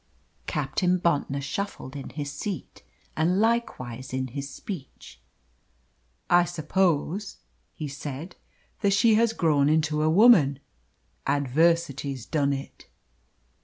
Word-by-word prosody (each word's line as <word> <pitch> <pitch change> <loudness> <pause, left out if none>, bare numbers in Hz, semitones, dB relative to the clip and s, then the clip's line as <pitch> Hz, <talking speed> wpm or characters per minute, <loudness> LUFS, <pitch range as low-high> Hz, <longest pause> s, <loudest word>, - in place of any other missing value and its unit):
Captain 180 -1 0
Bontnor 145 -5 0
shuffled 145 -3 -5
in 140 - -6
his 145 -1 -5
seat 200 -4 -6 0.3
and 175 +4 +2
likewise 130 - -1
in 130 0 -2
his 140 +3 -5
speech. 130 - -9 1.1
"I 175 0 +5
suppose," 175 +3 -1 0.4
he 155 - -5
said, 145 +4 -7 0.4
"that 200 -1 +2
she 225 +3 +4
has 230 +1 +4
grown 150 -9 +2
into 155 -1 +1
a 155 - +3
woman. 170 - +6 0.7
Adversity's 140 -2 +1
done 140 +5 +1
it." 135 0 -6
155 Hz, 110 wpm, -26 LUFS, 140-185 Hz, 1.1 s, woman